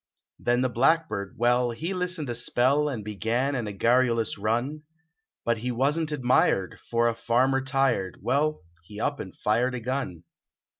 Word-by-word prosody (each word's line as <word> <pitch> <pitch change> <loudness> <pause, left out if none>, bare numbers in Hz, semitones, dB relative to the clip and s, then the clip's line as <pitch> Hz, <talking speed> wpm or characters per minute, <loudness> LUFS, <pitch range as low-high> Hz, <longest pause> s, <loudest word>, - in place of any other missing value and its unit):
Then 120 +1 +1
the 130 - +2
blackbird, 120 - +1
well, 120 +1 +3
he 160 +11 -3
listened 180 -4 -2
a - - -2
spell 130 +5 +2
And 120 -7 -4
began 115 +6 -1
in 120 -5 -2
garrulous 115 0 +2
run, 120 +9 -1 0.6
Hut 115 -1 +1
he 125 +2 -2
wasn 145 +7 +1
t 150 - -2
admired, 125 - +2
for 115 0 +2
a 115 - +1
farmer 125 +4 +1
tired 135 -9 0
Well, 150 0 0 0.2
he 105 +4 -10
up 140 +4 -1
and 95 - -8
fired 125 +4 +1
a - - -3
gun. 115 -9 -3
125 Hz, 160 wpm, -26 LUFS, 115-140 Hz, 0.6 s, well